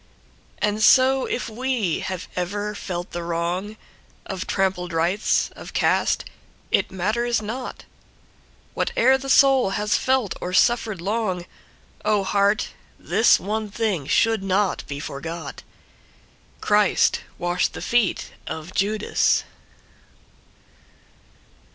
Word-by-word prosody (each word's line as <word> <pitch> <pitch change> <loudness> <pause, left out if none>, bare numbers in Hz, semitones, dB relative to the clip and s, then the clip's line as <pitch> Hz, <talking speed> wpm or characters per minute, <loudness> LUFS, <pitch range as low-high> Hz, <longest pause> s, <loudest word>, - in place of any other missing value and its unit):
And 210 0 0
so 260 +3 +5
if 245 - -2
we 230 -6 -1
have 185 -2 -5
ever 205 +4 -2
felt 180 -3 -5
the 175 - -4
wrongOf 175 +3 -5
Trampled 185 -3 -1
rights, 175 +6 +1
of - - -10
caste, - - +1 0.5
it - - +2
matters 220 +6 0
not, 230 +5 -6 0.9
What - - -1
e'er 265 - +5
the 270 0 -6
soul 270 -5 +5
has 210 0 +1
felt 260 -6 +1
or 180 - -4
suffered 220 -3 +2
long, 190 -3 -1 0.6
Oh, 210 -2 +2
heart! 200 +2 +1 0.3
this 225 - +4
one 215 +2 -3
thing 200 -9 -1
should 225 +3 +2
not 195 0 0
be 140 0 -5
forgot:Christ 155 +2 -2 0.2
washed 175 +1 0
the - - -7
feet 235 -5 +1 0.2
of 160 +3 -6
Judas. 210 +2 +1
205 Hz, 110 wpm, -23 LUFS, 180-225 Hz, 0.9 s, so